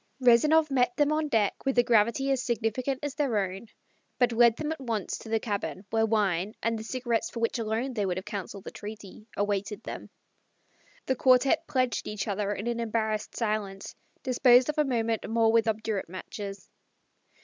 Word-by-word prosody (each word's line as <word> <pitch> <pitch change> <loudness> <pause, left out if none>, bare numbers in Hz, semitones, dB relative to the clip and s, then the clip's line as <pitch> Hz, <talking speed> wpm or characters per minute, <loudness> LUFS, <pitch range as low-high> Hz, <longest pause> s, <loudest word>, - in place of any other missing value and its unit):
Rezanov 295 +5 +5
met 250 -2 +2
them 290 0 +3
on 305 0 +1
deck 215 -7 0
with 270 -2 -1
a 245 - +6
gravity 235 +3 +2
as 265 -2 +1
significant 245 +2 -1
as 290 -2 -2
their 275 -7 0
own, 195 +2 -3 0.5
but 245 -1 +3
led 235 0 +5
them 305 0 -3
at 320 - -4
once 225 -6 -2
to 225 - -10
the 225 0 +1
cabin 200 -5 -4
where 225 0 +2
wine, 205 -2 0
and 230 0 +1
the - - -6
cigarettes 240 +5 -1
for 235 - -7
which 230 +1 0
alone 230 +4 -2
they 210 -4 -1
would 185 -2 -1
have 185 - -5
counselled 200 -1 -6
the - - -8
treaty, 210 0 -10
awaited 205 0 -2
them. - - -7 1.0
The 260 - +1
quartette 260 +6 +3
pledged 255 -4 0
each 210 0 -4
other 205 0 -1
in 205 +1 -4
an 235 0 -1
embarrassed 220 -2 -2
silence, 210 -4 -2 0.3
disposed 250 0 +5
of 300 - -1
a 300 - +4
moment 230 -5 -1
more 225 0 +3
with 225 0 +3
obdurate 220 -4 -2
matches. 195 +2 -7
225 Hz, 185 wpm, -28 LUFS, 210-255 Hz, 1.0 s, a